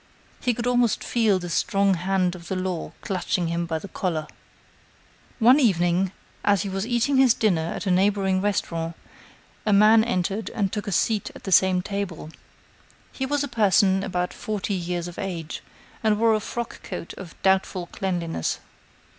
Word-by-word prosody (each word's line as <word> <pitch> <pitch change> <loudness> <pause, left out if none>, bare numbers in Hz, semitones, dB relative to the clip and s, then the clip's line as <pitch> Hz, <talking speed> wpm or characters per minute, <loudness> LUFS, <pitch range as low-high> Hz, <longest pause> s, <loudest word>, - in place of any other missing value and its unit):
He 245 -2 0
could 235 - -3
almost 245 -2 +2
feel 220 -5 +2
the 175 -1 -5
strong 195 +3 +2
hand 185 0 0
of 170 -2 -10
the 190 - -2
law 185 -2 -3
clutching 180 -2 -1
him 170 0 -1
by 160 -1 -1
the 160 - -7
collar. 165 -6 -2 1.1
One 250 +4 +6
evening, 180 - +2 0.3
as 200 -3 +3
he 200 - -4
was 195 +3 -3
eating 245 +3 +1
his 260 -3 +5
dinner 170 -7 +1
at - - -5
a 190 - +1
neighboring 190 0 +2
restaurant, 170 -5 -1 0.7
a 215 - +1
man 215 +2 +6
entered 200 -1 -1
and 200 -3 0
took 210 -1 -3
a - - -2
seat 210 +3 +1
at - - -12
the 195 - -4
same 185 0 +4
table. 195 -6 -4 0.8
He 265 - -3
was 290 +1 0
a - - -2
person 205 -5 +3
about 180 -1 -2
forty 210 -2 -3
years 175 -1 -2
of 175 - -9
age, 170 -5 -5 0.4
and 215 -2 +2
wore 225 0 +4
a 215 - +2
frock 235 +2 -5
coat 180 -3 -7
of 185 -4 -11
doubtful 190 -1 +2
cleanliness. 175 - -2
195 Hz, 170 wpm, -24 LUFS, 180-215 Hz, 1.1 s, One